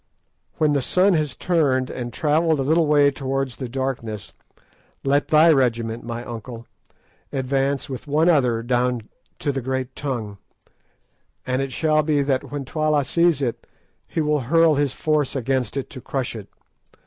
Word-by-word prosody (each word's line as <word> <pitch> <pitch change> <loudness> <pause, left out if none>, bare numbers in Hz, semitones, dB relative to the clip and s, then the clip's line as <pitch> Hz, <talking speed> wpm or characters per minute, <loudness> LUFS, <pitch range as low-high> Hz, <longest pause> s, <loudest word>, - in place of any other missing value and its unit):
When 150 -1 +2
the 140 - +2
sun 185 +8 +3
has 155 -5 0
turned 140 -7 +1
and 120 -1 -5
travelled 155 +4 +1
a - - +1
little 160 +3 +3
way 145 -1 +5
towards 135 -1 -3
the 130 -3 -5
darkness, 120 -5 -4 0.7
let 140 +1 +2
thy 155 +2 +6
regiment, 115 -5 +1
my 120 0 -5
uncle, 115 0 -8 0.7
advance 135 +1 -1
with 130 +1 -7
one 155 +4 +2
other 125 -9 +3
down 125 -1 0 0.3
to 145 - -1
the 135 -1 -3
green 130 0 -2
tongue, 115 -8 -4 1.1
and 130 +1 0
it 135 -1 -3
shall 155 +2 +2
be 150 -2 +1
that 135 -2 -1
when 145 -2 -4
Twala 155 0 +1
sees 170 0 +2
it 120 -3 -3 0.4
he 160 - -2
will 150 -1 +1
hurl 160 +5 +4
his 145 -2 +1
force 150 -1 0
at 130 -3 -4 0.3
it 135 - -3
to 130 - -9
crush 130 -2 -3
it. 105 -3 -9
135 Hz, 160 wpm, -22 LUFS, 125-150 Hz, 1.1 s, thy